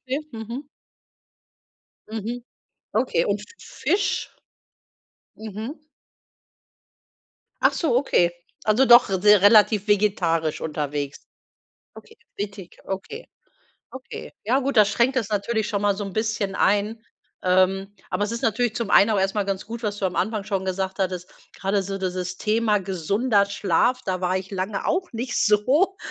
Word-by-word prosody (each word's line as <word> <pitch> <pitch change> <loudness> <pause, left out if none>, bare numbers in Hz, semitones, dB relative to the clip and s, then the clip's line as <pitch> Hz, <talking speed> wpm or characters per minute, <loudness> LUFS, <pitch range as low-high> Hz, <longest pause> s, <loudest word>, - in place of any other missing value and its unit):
Okay, 265 +3 -3
mhm. 235 +5 -7 1.4
Mhm. 225 +3 -5 0.5
Okay. 215 -7 +1
Und 205 +1 -1 0.2
Fisch? 380 -2 -1 1.0
Mhm. 220 +5 -6 1.9
Ach - - +5
so, 290 -9 +1
okay. 180 -10 +2 0.3
Also, 220 +5 +4
doch 240 0 +7
s 190 -2 -1
relativ 210 0 +6
vegetarisch 175 -6 +1
unterwegs. 145 -2 -4 0.7
Okay, 450 - -15 0.2
richtig. 195 -3 -6
Okay, 195 - -6 0.6
okay. 260 0 -9
Ja 250 +6 +2
gut, 275 -2 -2
das 210 -1 +6
schränkt 240 +5 +2
es 220 -4 -1
natürlich 215 +1 -1
schon 200 -2 -2
mal 205 -1 +2
so 205 - -4
'n 195 -2 -7
bisschen 215 -2 -1
ein. 210 +3 +1 0.4
Ähm, 190 +2 +2 0.2
aber 195 +3 -1
es 210 - -2
ist 230 - -4
natürlich 225 +1 +1
zum 230 -2 -3
einen 205 +2 +6
auch 205 - +2
erst 195 +1 0
mal 205 - +1
ganz 195 -1 -3
gut, 230 +2 -7
was 205 -1 -2
du 200 - -1
am 180 - -2
Anfang 215 -2 -1
schon 195 -2 -2
gesagt 190 0 -3
hattest. 185 -2 -2 0.2
Gerade 195 +1 -1
so 195 +1 -4
dieses 185 -1 -3
Thema 215 0 +1
gesunder 200 +4 +1
Schlaf, 200 +4 +1
da 185 -1 -2
war 185 +1 +1
ich 190 0 -7
lange 195 +1 -3
auch 370 -1 0
nicht 240 +2 -4
so 265 - +3
205 Hz, 145 wpm, -23 LUFS, 190-230 Hz, 1.9 s, doch